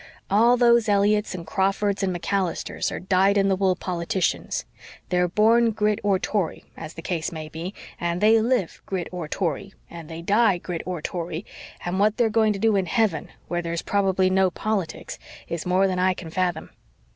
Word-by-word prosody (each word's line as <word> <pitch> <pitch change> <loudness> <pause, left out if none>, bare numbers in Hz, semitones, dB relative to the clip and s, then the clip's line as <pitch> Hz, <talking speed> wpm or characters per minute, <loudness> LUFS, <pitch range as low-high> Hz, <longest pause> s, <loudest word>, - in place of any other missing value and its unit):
All 235 +5 +5
those 235 -2 +4
Elliotts 205 0 +2
and 170 -2 -7
Crawfords 195 +2 0
and 195 -1 +1
MacAllisters 180 0 -2
are - - -4
dyed 190 +2 +3
in 195 0 +3
the 190 - +3
wool 190 -1 +2
politicians. 180 0 -2 0.4
They're 180 0 +2
born 225 +5 +4
Grit 210 -1 0
or 200 -2 +2
Tory, 190 -3 -2
as 155 - -9
the 165 - -8
case 165 -3 -2
may 155 -2 -7
be, 165 +5 -6 0.2
and 170 0 -1
they 220 +2 +5
live 230 -6 0
Grit 185 -3 -3
or 175 -3 -5
Tory, 185 +4 -3 0.2
and 170 -2 -9
they 165 +1 -7
die 205 0 +3
Grit 175 -1 -5
or 175 -4 -4
Tory; 170 +1 -4 0.4
and 180 +2 -1
what 210 +1 +3
they're 230 -2 +2
going 220 -1 +3
to - - -5
do 220 +1 +2
in 190 -2 +1
heaven, 195 -7 +1 0.2
where 175 0 -1
there's 170 -1 -3
probably 190 -2 +2
no 190 0 +3
politics, 195 -3 -3 0.3
is 170 +1 -4
more 185 +2 +3
than 185 -1 -1
I 185 0 +2
can 165 -3 -8
fathom. 175 -2 -1
190 Hz, 190 wpm, -24 LUFS, 175-210 Hz, 0.4 s, All